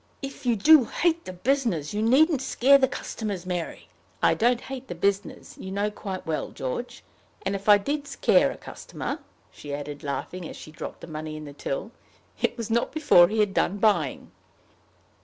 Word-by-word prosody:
If 275 -1 -6
you 235 - +4
do 295 +5 +7
hate 335 +6 0
the - - -5
business, 215 - 0
you 210 - -1
needn't 275 +5 +4
scare 270 +1 +5
the 265 - +4
customers, 210 -8 -5
Mary." 175 -2 -4 0.4
"I - - +5
don't 240 +1 +2
hate 265 -1 -7
the 175 - -6
business, 200 +3 -2
you 190 - -7
know 205 +2 -1
quite 195 -3 -6
well, 160 -1 -2
George. 130 - -5 0.4
And - - 0
if 200 +1 -3
I 205 - +9
did 285 +8 -3
scare - - +3
a - - -7
customer," - - -6 0.3
she 145 -1 -6
added, 145 0 -7
laughing, 165 +4 -4
as - - -9
she 155 - -11
dropped 155 - -8
the - - -7
money 155 -1 -6
in 155 - -8
the 145 - -9
till, 140 +8 -4 0.5
"it - - 0
was 230 -1 -4
not 235 +1 +1
before 290 - +6
he 215 +2 +1
had 205 -2 +1
done 200 - +1
buying." 210 0 +1
205 Hz, 190 wpm, -26 LUFS, 175-260 Hz, 0.5 s, I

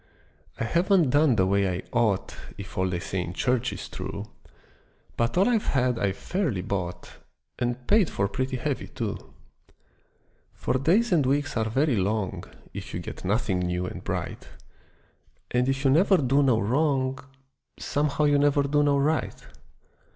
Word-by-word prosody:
I - - 0
haven't 170 - +3
done 145 -2 +4
the 95 -3 +3
way 100 0 +2
I 90 +1 -3
ought 110 -5 +1 0.2
If 100 -1 -9
all 95 0 0
they 90 -1 -2
say 95 +1 -3
in 90 0 -5
church 125 +3 0
is - - -7
true, - - -6 0.8
But 115 +4 0
all 190 - +5
I've 230 -4 +1
had 125 -3 +1
I've 100 -3 0
fairly 155 - -2
bought, 90 -2 -4 0.5
And 120 0 -2
paid 205 -5 +4
for 100 - 0
pretty 130 +5 -2
heavy 135 +2 -3
too. - - -5 1.2
For 130 - -1
days 195 - +3
and 165 -5 +4
weeks 145 +2 0
are 110 -2 0
very 135 +1 +1
long 100 0 -1 0.3
If - - -7
you - - -2
get - - -8
nothing 100 -1 0
new 90 0 -1
and - - -7
bright, - - -4 1.0
And 125 +1 +2
if 135 +1 -1
you 135 - +5
never 185 +6 +5
do 135 -1 +2
no 130 -5 +3
wrong 130 +3 +1 0.6
Somehow 150 +1 0
you 145 -1 +4
never 145 0 +3
do 145 +1 +2
no 145 -1 +3
right. 150 +3 0
130 Hz, 165 wpm, -26 LUFS, 100-145 Hz, 1.2 s, all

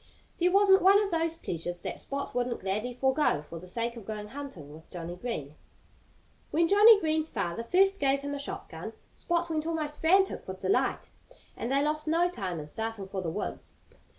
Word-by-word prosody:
There 355 +1 +3
wasn't 395 0 +6
one 390 +2 +7
of 410 -2 -1
those 330 0 0
pleasures 175 - -4
that - - -4
Spot 280 0 -4
wouldn't 245 -1 -1
gladly 210 +6 -2
forgo 265 - +2
for 165 +2 -9
the 180 - -12
sake 235 +5 -2
of 225 -4 -10
going 210 -1 -5
hunting 220 - -8
with 160 +1 -14
Johnnie 175 0 -6
Green. 180 - -5 1.0
When 335 +2 +2
Johnnie 415 +3 +8
Green's 315 -2 0
father 175 -2 -2
first 390 +10 +3
gave 275 0 +2
him 285 0 -4
a 285 - -4
shotgun 385 +8 -6 0.2
Spot 345 0 -1
went 310 0 -1
almost 305 -3 -3
frantic 380 +4 +3
with - - -7
delight. - - 0 0.4
And 235 - -4
they 275 +1 +2
lost 305 +1 -1
no 335 +3 +3
time 185 - -4
in 150 - -6
starting 220 +3 -5
for 190 -1 -3
the 170 - -3
woods. 205 +6 -5
275 Hz, 190 wpm, -29 LUFS, -, 1.0 s, Johnnie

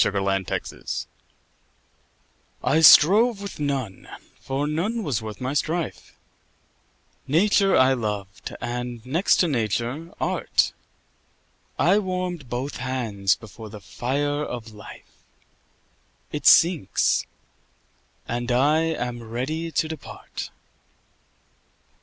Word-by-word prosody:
9 - - +1
Autoplay 95 -1 -2 1.6
I 160 +3 +3
strove 205 +9 +7
with 200 -4 -7
none, 135 -9 -3 0.3
for 135 +2 -2
none 190 +10 -1
was 130 - -1
worth 110 -1 -7
my 130 +1 -2
strife: 160 +3 -3 1.1
Nature 195 +6 +3
I 130 +1 +5
loved, 105 -5 -4
and, 120 -1 -5
next 160 +9 +2
to 175 - +3
Nature, 120 +4 -2
Art: - - +1 1.0
I 185 +6 +4
warm'd 180 - -3
both 130 +4 -3
hands 115 -7 0
before 110 0 -11
the 105 0 -9
fire 145 +9 -2
of 115 -5 -6
Life; 105 - -14 1.1
It 150 -2 -1
sinks; 165 - +4 1.0
and 120 +1 -2
I 145 +6 +3
am 125 -7 -2
ready 130 +9 -3
to 160 - 0
depart. 160 -2 -8
135 Hz, 100 wpm, -24 LUFS, 115-160 Hz, 1.6 s, strove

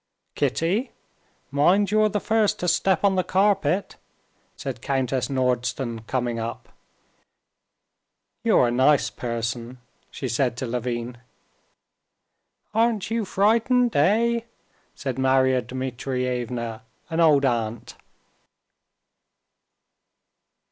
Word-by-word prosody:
"Kitty, 195 +10 0 0.6
mind 180 +8 +3
you're 215 0 +4
the 205 - -1
first 220 0 +1
to 180 - -3
step 190 +1 +2
on 200 -1 +4
the 185 -1 +1
carpet," 195 -2 +1 0.6
said - - -6
Countess 130 -2 -1
Nordston, 125 -3 -1
coming 120 -3 -1
up. 115 +1 -6 1.7
"You're 120 - +4
a - - -2
nice 130 +4 +3
person!" 115 +1 -4 0.3
she 135 - -5
said 120 0 0
to 130 - -3
Levin. 120 0 -4 1.5
"Aren't 225 -2 +1
you 225 -2 0
frightened, 230 +5 +2
eh?" 225 +10 +3 0.6
said 135 -2 -4
Marya 130 -1 +3
Dmitrievna, 125 -2 -3 0.3
an 165 - -1
old 150 -4 +5
aunt. 115 -3 -2
130 Hz, 95 wpm, -24 LUFS, 120-195 Hz, 1.7 s, old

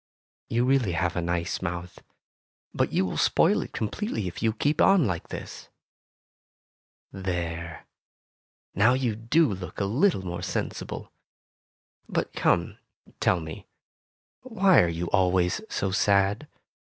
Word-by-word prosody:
You 120 +2 +1
really 130 -8 +2
have 90 0 0
a 90 - 0
nice 85 0 -2
mouth, 90 0 -5 0.7
but - - 0
you 95 - +1
will 90 - -4
spoil - - +3
it - - -7
completely 110 - -3
if 85 - -7
you 110 - +2
keep 145 +7 0
on 195 -6 +5
like 90 -6 -3
this. - - -8 1.4
There! 85 -3 -4 0.9
Now 110 +6 +4
you 125 -4 -1
do 115 +4 +2
look 90 -2 -7
a 100 - +1
little 120 - +1
more 90 -1 -4
sensible. - - -4 1.0
But - - -2
come, - - +1 0.4
tell 90 - +2
me, 80 -1 -8 0.7
why 195 -7 +4
are 85 - +2
you 85 +1 -3
always 90 -1 +2
so 95 - -1
sad 100 +6 +2
95 Hz, 130 wpm, -26 LUFS, 90-120 Hz, 1.4 s, on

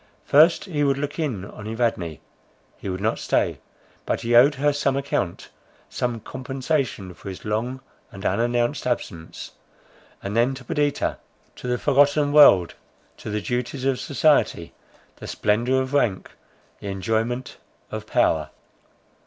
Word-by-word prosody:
First, 160 +4 +5
he 155 -7 -1
would 140 -1 +2
look 145 +2 -4
in 120 - -2
on 105 +1 -10
Evadne; 110 -9 -1 0.6
he 100 - -7
would 95 +1 -4
not 110 +2 0
stay; - - 0 0.4
but - - -2
he 120 +1 +1
owed 135 +5 +7
her 145 +2 +2
some 140 -1 0
account, 135 -10 -2 0.4
some 120 -2 -2
compensation 130 - -3
for 95 +3 -9
his 95 - -9
long 120 +5 -2 0.3
and 95 -2 -10
unannounced 120 +6 0
absence; 85 -9 -4 0.7
and 100 +2 -4
then 120 +3 +2
to 130 - -10
Perdita, 145 +3 0 0.4
to - - -8
the 125 0 +1
forgotten 145 +2 +3
world, 100 - +7 0.4
to - - -8
the 105 0 -2
duties 125 +3 -3
of 135 -2 +1
society, 140 - +1 0.4
the - - -9
splendour 120 +5 +1
of 130 +1 -7
rank, 115 -10 +1 0.5
the - - -8
enjoyment 110 +6 -2 0.3
of - - -6
power. - - +2
125 Hz, 145 wpm, -23 LUFS, 105-140 Hz, 0.7 s, owed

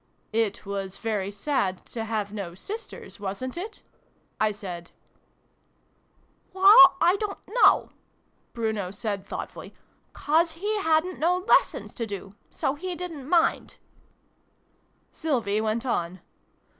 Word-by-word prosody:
"It 220 -3 0
was 195 -1 -4
very 210 -4 -2
sad 200 -3 -1
to 225 -2 -3
have 210 -2 -3
no 190 -5 -5
sisters, 425 - -8
wasn't 205 +6 -4
it? 400 +6 -7 0.3
" - - -20
I 215 - +4
said. 180 -4 -7 1.6
"Well, 375 -1 +8
I 355 +3 +4
don't 415 -2 -3
know," 430 -5 +4 0.6
Bruno 220 -5 -2
said 200 0 -4
thought - - -5
fully; - - -11 0.2
" - - -41
'cause 325 +3 +2
he 415 +6 -2
hadn't 325 +1 +1
no 350 +3 +2
lessons 365 - +2
to 230 -3 -4
do. 195 -1 -7 0.2
So 270 - -1
he 360 +4 -5
didn't 325 -6 -7
mind." 335 -1 +2 1.3
Sylvie 230 -9 -1
went 220 +3 -1
on. 180 -7 -2
230 Hz, 130 wpm, -26 LUFS, -, 1.6 s, Well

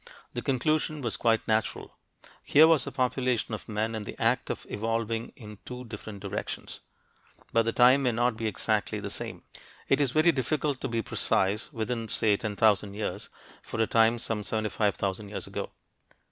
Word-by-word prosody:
The - - -3
conclusion 155 +3 0
was 115 - -1
quite 115 -1 +1
natural: 110 0 -1 0.5
here 155 +2 +6
was 160 -5 +4
a - - -3
population 125 -3 0
of 110 - -6
men 110 +1 -1
in 110 -1 -3
the - - -8
act - - +1
of - - -4
evolving 115 +1 -2
in 105 -3 -11
two 125 0 -7
different 105 -2 -8
directions. - - -5 0.7
But 115 0 +4
the 115 - +1
time 125 +4 +6
may 125 -2 +2
not 120 +1 +1
be 110 0 -2
exactly 105 0 0
the 100 -1 -5
same. - - -6 0.4
It 135 - +3
is 140 - +3
very 155 +6 +4
difficult 140 0 -1
to - - -1
be 115 -2 -1
precise, 100 +7 0
within 115 -2 -3
say 105 0 +3
10,000 105 -1 +1
years, 105 - -4 0.3
for - - -6
a 110 - +4
time 115 +1 +4
some 115 -2 -2
75,000 105 -2 -1
years 105 - -5
ago. - - -5
115 Hz, 175 wpm, -28 LUFS, 105-125 Hz, 0.7 s, here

